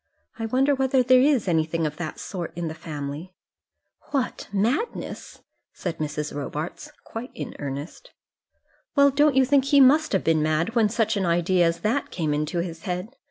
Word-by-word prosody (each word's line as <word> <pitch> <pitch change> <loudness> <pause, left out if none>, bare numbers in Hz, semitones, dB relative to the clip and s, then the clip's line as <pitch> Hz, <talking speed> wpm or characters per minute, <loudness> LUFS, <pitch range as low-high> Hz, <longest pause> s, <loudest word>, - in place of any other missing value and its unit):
I 225 - -2
wonder 265 +5 +2
whether 265 -1 +2
there 255 +1 +6
is 270 -7 +3
anything 165 -1 +1
of 150 0 -3
that 160 -3 -5
sort 175 -4 -5
in 170 -1 -3
the - - -5
family?" 155 +2 -7 0.7
"What; 270 -3 -2
madness?" 235 - -2 0.3
said 170 -3 -5
Mrs. 150 0 -3
Robarts, 145 +3 -5
quite 230 +3 -7
in - - -6
earnest. 145 - -6 0.9
"Well, 280 -1 +6
don't 290 0 +3
you 265 -1 +5
think 275 0 +3
he 280 0 +4
must 285 +3 +5
have 195 - +1
been 160 -1 +2
mad 155 +7 0
when 225 -3 +3
such 225 -1 0
an 190 -3 0
idea 175 +1 +3
as 165 0 -2
that 240 +6 0
came 155 -4 -1
into 150 +3 -1
his 170 -2 -6
head? 180 +3 -3
185 Hz, 175 wpm, -24 LUFS, 160-255 Hz, 0.9 s, there